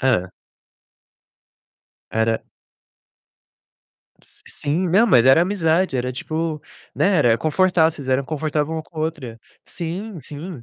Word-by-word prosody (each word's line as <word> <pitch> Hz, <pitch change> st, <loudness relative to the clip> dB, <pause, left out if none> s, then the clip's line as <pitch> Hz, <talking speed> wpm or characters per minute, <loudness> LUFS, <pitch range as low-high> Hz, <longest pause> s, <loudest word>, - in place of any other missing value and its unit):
Hã. 95 Hz, -9 st, +1 dB, 1.8 s
Era 110 Hz, 0 st, 0 dB, 2.0 s
Sim. 170 Hz, +6 st, -2 dB
Não, 205 Hz, +7 st, +4 dB
mas 125 Hz, -, +5 dB
era 135 Hz, +5 st, +6 dB
amizade, 175 Hz, -4 st, +1 dB
era, 125 Hz, 0 st, -1 dB
tipo, 155 Hz, +4 st, -3 dB, 0.3 s
né, 200 Hz, 0 st, +2 dB
era 120 Hz, -5 st, +3 dB
confortável, 165 Hz, 0 st, +2 dB
vocês 140 Hz, -4 st, -9 dB
eram 130 Hz, +1 st, +1 dB
confortável 155 Hz, +1 st, -2 dB
uma 160 Hz, -1 st, -3 dB
com 160 Hz, -, -23 dB
a -, -, -1 dB
outra. 145 Hz, -8 st, -4 dB, 0.2 s
Sim, 180 Hz, +4 st, -6 dB
sim. 150 Hz, +1 st, -8 dB
155 Hz, 120 wpm, -21 LUFS, 130-170 Hz, 2.0 s, era